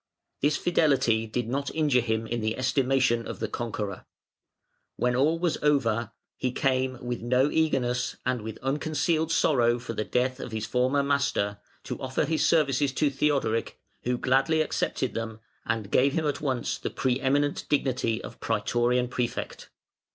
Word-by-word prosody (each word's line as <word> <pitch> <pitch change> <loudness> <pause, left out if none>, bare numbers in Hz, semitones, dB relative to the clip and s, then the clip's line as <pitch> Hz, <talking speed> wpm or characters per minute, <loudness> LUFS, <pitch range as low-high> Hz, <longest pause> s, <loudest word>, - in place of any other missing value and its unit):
This 145 +1 +2
fidelity 130 -10 +2
did 115 +1 -2
not 140 +3 -2
injure 145 -6 +3
him 110 -1 -1
in 120 +1 -3
the 110 +1 -1
estimation 130 -2 +1
of - - -5
the 110 - -1
conqueror. 105 -4 -4 0.9
When 125 0 +1
all 150 +6 +3
was 170 -1 0
over, 120 -6 +1 0.3
he 125 - -1
came, 130 0 0
with 120 -1 -3
no 125 +4 +2
eagerness, 125 -6 +1
and 125 -2 0
with 110 0 -6
unconcealed 155 +3 0
sorrow 120 -7 +3
for 120 -1 -6
the 110 - -2
death 130 +3 0
of 120 - -7
his 110 -1 -2
former 130 +3 +1
master, 135 -8 0 0.2
to - - -5
offer 130 +2 -1
his 160 +1 0
services 145 -4 +3
to 145 +1 +1
Theodoric, 135 -5 0 0.2
who 125 0 -1
gladly 135 +6 +2
accepted 130 -4 -1
them, 110 -1 -4 0.3
and 110 -3 -2
gave 135 +2 +4
him 160 0 0
at 145 -2 -1
once 130 -5 -1
the - - -3
pre 130 -1 0
eminent 145 +2 +1
dignity 130 -5 0
of - - -9
Prætorian 120 +3 +1
Prefect. 125 -1 -4
130 Hz, 160 wpm, -27 LUFS, 115-140 Hz, 0.9 s, gave